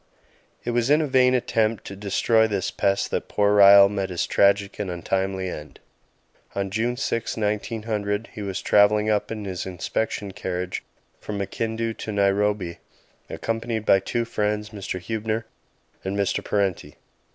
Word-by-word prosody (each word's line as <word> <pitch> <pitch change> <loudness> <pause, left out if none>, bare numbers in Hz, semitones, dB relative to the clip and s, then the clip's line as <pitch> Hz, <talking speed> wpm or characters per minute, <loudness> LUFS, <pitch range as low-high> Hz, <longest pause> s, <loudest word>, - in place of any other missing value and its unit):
It 120 - -2
was 120 +1 +1
in 150 +2 +5
a 155 - +1
vain 130 -2 +4
attempt 115 -3 0
to 100 - -7
destroy 110 +3 +2
this 100 -4 -2
pest 100 0 0
that - - -2
poor 105 0 +2
Ryall 100 0 +9
met 100 -1 -2
his 90 -2 -1
tragic 100 0 +2
and 100 -3 -2
untimely 95 +2 -2
end. 75 -4 -8 0.8
On 100 -1 -2
June 120 +4 -1
6, 115 -3 -2
1900, 105 0 -2
he 110 - -7
was 100 -1 -4
travelling 105 +1 +4
up 105 +1 0
in 110 -2 -5
his 95 -1 -4
inspection 100 +2 -3
carriage 90 -2 -4 0.4
from 105 - -5
Makindu 115 +3 -2
to 110 - -4
Nairobi, 100 -3 +1 0.5
accompanied 115 -1 -3
by 95 - +5
two 115 +5 -2
friends, 105 -1 -2
Mr. 100 -3 -5
Huebner 110 +4 -3 0.6
and 95 +1 -3
Mr. 100 -2 0
Parenti. 100 -4 -1
105 Hz, 150 wpm, -24 LUFS, 100-110 Hz, 0.8 s, Ryall